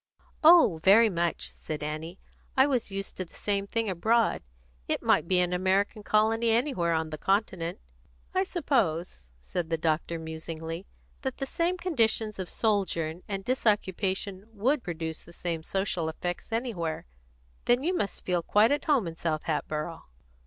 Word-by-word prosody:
"Oh, 315 - +7
very 215 +3 +7
much," 170 -2 -1
said 150 -1 -6
Annie. 155 +4 -5 0.4
"I 265 - +7
was 255 -7 0
used 195 0 -4
to 185 - -2
the - - -21
same 200 -1 -1
thing 230 +1 -1
abroad. 220 +5 +2 0.5
It - - -1
might - - +3
be 185 - +3
an 180 0 +1
American 190 +3 +1
colony 220 +2 +2
anywhere 225 - +2
on 160 -1 -1
the 155 - -5
Continent." 190 -3 0 0.6
"I 375 - +3
suppose," 235 - 0 0.2
said 165 - -3
the 165 - +1
doctor 160 +1 0
musingly, 160 +2 -6 0.3
"that 265 -2 -3
the 270 - -2
same 340 +6 0
conditions 225 - +1
of 185 - -3
sojourn 180 -6 0
and 195 -1 -4
disoccupation 200 -4 0
would 250 +7 +1
produce 160 -3 -5
the 170 - -15
same 170 -2 -3
social 180 -2 -1
effects 175 +5 -5
anywhere. 220 -9 -2 0.6
Then 245 +2 +3
you 360 +4 +1
must 200 - -3
feel 180 -2 +1
quite 210 +7 +4
at 290 - 0
home 285 - +3
in 165 -1 -5
South 155 -2 -1
Hatboro'!" 155 +1 -3
190 Hz, 160 wpm, -28 LUFS, 165-225 Hz, 0.6 s, Oh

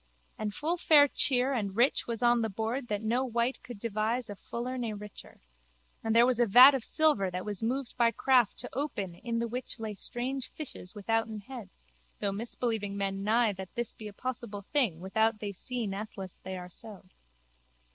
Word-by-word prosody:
And 215 -1 -3
full 320 +10 -1
fair 295 -4 +6
cheer 260 -1 +3
and 200 -6 -2
rich 240 +5 +2
was 235 0 -3
on 240 0 +4
the 225 - 0
board 225 +6 -3
that 210 -1 -2
no 235 +4 +1
wight 240 0 -1
could 245 -3 -9
devise 220 +2 -1
a - - -6
fuller 240 +5 -5
ne 235 -4 -3
richer. 210 0 -11 0.6
And 225 0 0
there 235 +1 +7
was 250 -1 +1
a 240 - +4
vat 250 +7 +9
of 265 -4 -1
silver 295 -13 +4
that 180 0 -5
was 205 -3 -3
moved 250 +3 -2
by 235 -1 +5
craft 245 0 +3
to 245 - -5
open 210 - -3
in 230 +6 -4
the 235 0 0
which 245 +1 -4
lay 220 -1 -4
strange 250 +6 -3
fishes 240 - -9
withouten 220 +1 -1
heads 220 -3 -11 0.3
though 200 -1 0
misbelieving 220 -1 -2
men 195 0 -2
nie 220 +1 +3
that 190 -1 -9
this 240 -1 -2
be 215 -1 -8
possible 225 -2 -5
thing 210 - +1
without 220 +4 +1
they 205 -1 -4
see 245 +5 -3
it 210 - -2
natheless 195 -2 -7
they 190 0 -6
are 180 0 -8
so. 210 -1 -10
225 Hz, 195 wpm, -30 LUFS, 205-245 Hz, 0.6 s, vat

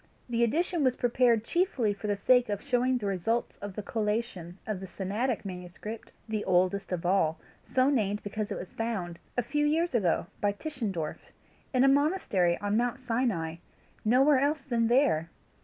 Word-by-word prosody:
The 235 0 +2
edition 330 +7 +1
was 255 -2 +3
prepared 240 -2 +3
chiefly 255 - +1
for 205 +1 -6
the 205 -1 0
sake 245 +3 +4
of 205 -1 -1
showing 250 +1 +2
the 220 - -5
results 200 +5 -1
of 200 -2 -7
the 210 - -4
collation 210 -5 -2
of 215 -3 -3
the 190 - -7
Sinaitic 210 +6 -2
manuscript, 185 +4 -7 0.2
the 215 -1 -2
oldest 185 +2 +1
of 175 -1 -2
all, 165 -4 +2 0.2
so 260 0 +2
named 210 -7 +1
because 210 +1 -4
it - - -2
was 180 - -8
found 195 -7 -3 0.2
a 245 - +2
few 295 +5 0
years 330 +2 +1
ago, 190 -10 +2 0.2
by 205 -1 +2
Tischendorf 205 - -4 0.4
in 255 -1 +3
a - - +6
monastery 275 - +2
on 205 0 -1
Mount 240 +2 0
Sinai 225 -10 -1 0.5
nowhere 260 +5 +5
else 285 +1 +1
than 235 -4 +1
there! 235 - +3
225 Hz, 175 wpm, -29 LUFS, 195-255 Hz, 0.5 s, a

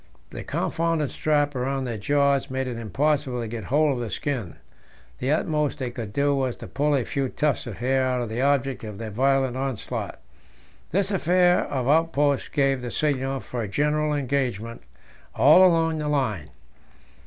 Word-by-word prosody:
The - - -6
confounded 165 -3 -1
strap 145 -1 +1
round 135 +1 -2
their 120 -2 -3
jaws 140 +3 +2
made 130 0 -2
it 125 -2 -4
impossible 135 - 0
to 115 - -3
get 110 -2 -6
hold 145 +5 +2
of 125 - -4
the 120 -2 -3
skin; 120 - -3 0.6
the 130 +3 0
utmost 150 -1 0
they 130 -4 -3
could 115 -4 -6
do 140 +5 +1
was 130 -3 -1
to - - -10
pull 145 +1 +1
a 130 -4 0
few 135 -2 -2
tufts 145 -3 -1
of 110 - -6
hair 130 +2 +1
out 125 -1 0
of 120 - -2
the 110 +3 -3
object 135 -2 +1
of 105 -2 -7
their 110 0 -6
violent 135 +2 +1
onslaught. 135 -4 -4 0.7
This 195 +3 0
affair 180 -1 +3
of 130 -3 -2
outposts 145 -2 +2
gave 135 -3 +1
the 125 - -4
signal 135 -2 -1
for 120 - -5
a 110 - -3
general 150 +7 0
engagement 125 -5 -2 0.5
all 150 +10 +7
along 165 -3 +3
the 150 - -2
line. 110 - -1
135 Hz, 175 wpm, -25 LUFS, 125-150 Hz, 0.7 s, all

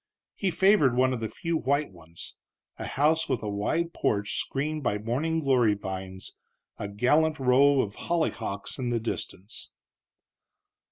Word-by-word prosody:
He 195 - 0
favored 180 - +4
one 130 +1 +3
of 125 - -3
the 110 -1 -3
few 165 0 -2
white 140 -2 0
ones, 85 -2 -11 0.4
a - - -4
house 160 +3 +1
with 120 - -1
a - - -3
wide 155 +12 -1
porch 100 -1 0
screened 150 +3 -2
by 105 -6 0
morning 140 +10 -1
glory 125 -7 +3
vines, 95 -1 -7 0.5
a 100 - -3
gallant 150 +10 +2
row 135 +2 +5
of 100 -4 -4
hollyhocks 150 -9 -2
in 125 -2 -1
the 120 -1 0
distance. 110 -2 -6
130 Hz, 150 wpm, -27 LUFS, 105-155 Hz, 0.5 s, row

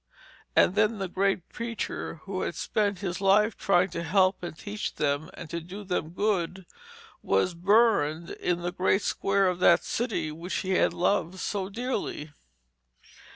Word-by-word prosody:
And - - +5
then 215 +2 +2
the 195 -1 -3
great 190 -1 0
preacher, 230 -8 -5
who 190 -1 -4
had - - -3
spent 205 -4 -1
his 185 -1 -3
life 205 +2 +4
trying 185 -1 +2
to 170 - -3
help 185 +3 +2
and 175 -3 -6
teach 210 +3 -5
them, 145 +1 -1
and - - -8
to 170 - -2
do 185 +5 -8
them 180 -5 -2
good, 190 -2 -1 0.6
was 95 - +1
burned 175 -4 +2
in 175 -1 -2
the 175 - -1
great 190 +2 +1
square 195 0 +1
of 180 -1 -1
that - - +5
city 225 -10 -2
which 170 +4 -5
he 190 - -1
had 185 - +3
loved 180 0 0
so 190 0 -3
dearly. 215 - -3
190 Hz, 160 wpm, -27 LUFS, 170-205 Hz, 0.6 s, And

